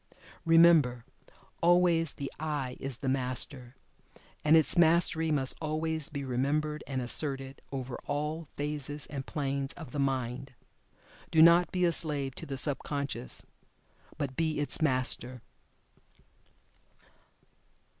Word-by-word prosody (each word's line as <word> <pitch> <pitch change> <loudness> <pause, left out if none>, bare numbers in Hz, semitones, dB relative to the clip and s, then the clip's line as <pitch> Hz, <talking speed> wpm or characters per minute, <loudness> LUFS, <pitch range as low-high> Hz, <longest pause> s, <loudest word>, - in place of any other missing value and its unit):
Remember, 165 -8 +5 0.6
always, 170 -2 +3
the 140 -1 -6
"I" 145 -5 -3
is 135 -3 -4
the 135 - -5
Master. 130 -1 -2 0.7
And 155 +2 +6
its 160 - +3
Mastery 165 -1 +3
must 135 -4 +2
always 155 0 -1
be 140 -2 -5
remembered 150 +4 -1
and 130 -2 -2
asserted 135 +1 -2
over 130 -2 -5
all 150 +2 -3
phases 145 0 -3
and 135 -2 -5
planes 140 -2 -2
of 165 -3 -10
the 145 - -4
mind. 130 -1 -2 0.7
Do 160 - +2
not 170 +1 +6
be 180 -1 +1
a 170 - +3
slave 145 -5 0
to - - -7
the 135 -1 -4
sub 140 +1 -1
conscious, 140 - -3 0.7
but 140 -4 -3
be 160 -1 0
its 145 - 0
MASTER. 130 -3 0
145 Hz, 125 wpm, -30 LUFS, 135-160 Hz, 0.7 s, And